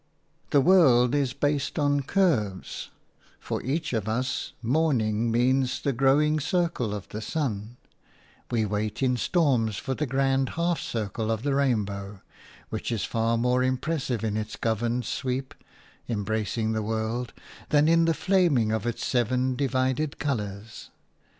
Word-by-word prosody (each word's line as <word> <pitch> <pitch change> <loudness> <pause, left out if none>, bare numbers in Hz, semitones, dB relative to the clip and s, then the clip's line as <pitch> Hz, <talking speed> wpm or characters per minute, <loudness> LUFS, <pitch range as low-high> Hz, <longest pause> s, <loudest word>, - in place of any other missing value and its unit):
The 140 - +4
world 130 -8 +5
is 140 -4 +1
based 145 +1 -1
on 145 -2 +2
curves; 135 - 0 0.5
for - - -4
each 140 +3 -2
of 110 -2 -1
us 125 +4 -2
morning 120 -5 +1
means 130 +2 +2
the 140 - -1
growing 145 +5 +3
circle 160 - 0
of 100 - -7
the 105 - -6
sun; 115 -5 -3 0.7
we 115 -3 +1
wait 105 +4 -2
in 125 -1 +2
storms 125 - +1
for 135 - -3
the 150 +3 -2
grand 135 0 +1
half 170 0 +1
circle 110 0 -3
of 110 0 -1
the 140 -1 0
rainbow, 105 -7 -1 0.5
which 110 +2 -4
is 115 -4 -1
far 115 0 0
more 125 +2 +2
impressive 130 -2 -1
in 110 -1 -1
its 110 -1 -4
governed 115 +2 -1
sweep 130 0 -3 0.3
– - - -29
embracing 110 0 -1
the 110 0 -1
world 110 +3 -2 0.2
– - - -19
than 150 0 +4
in 165 0 +4
the 165 -1 +2
flaming 170 - +2
of 110 +1 -1
its 120 - -3
seven 125 +1 +1
divided 130 +2 0
colours. 110 -5 -4
125 Hz, 150 wpm, -26 LUFS, 110-140 Hz, 0.7 s, world